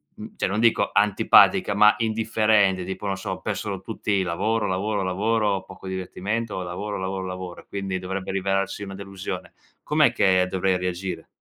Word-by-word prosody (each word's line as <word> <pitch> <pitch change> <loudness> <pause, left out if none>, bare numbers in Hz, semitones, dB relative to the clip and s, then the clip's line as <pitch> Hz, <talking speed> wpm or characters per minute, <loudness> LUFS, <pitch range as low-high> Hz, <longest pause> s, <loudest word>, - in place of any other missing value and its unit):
mhmm, - - -10
cioè - - -1
non 100 +3 -1
dico 115 0 +3
antipatica, 100 0 +5
ma 105 +1 +6
indifferente 110 -4 +2
tipo 95 +2 -6
non 95 - 0
so, 95 -1 -5
per 100 +2 -3
sono 100 -3 -4
tutti 100 -1 -1
lavoro, 105 +5 0
lavoro, 100 +2 -1
lavoro, 100 +1 0
poco 95 0 -12
divertimento, 95 +3 -3
lavoro, 95 +4 -4
lavoro, 95 0 -3
lavoro, 90 -1 -6
e - - -27
quindi 95 -2 -3
dovrebbe 95 +1 -4
rivelarsi 95 +1 -1
una 95 -1 -7
delusione, 100 -1 -6 0.3
com'è - - +3
che 95 -1 +3
dovrei 95 0 +1
reagire? 90 +1 -4
95 Hz, 165 wpm, -24 LUFS, 95-105 Hz, 0.3 s, ma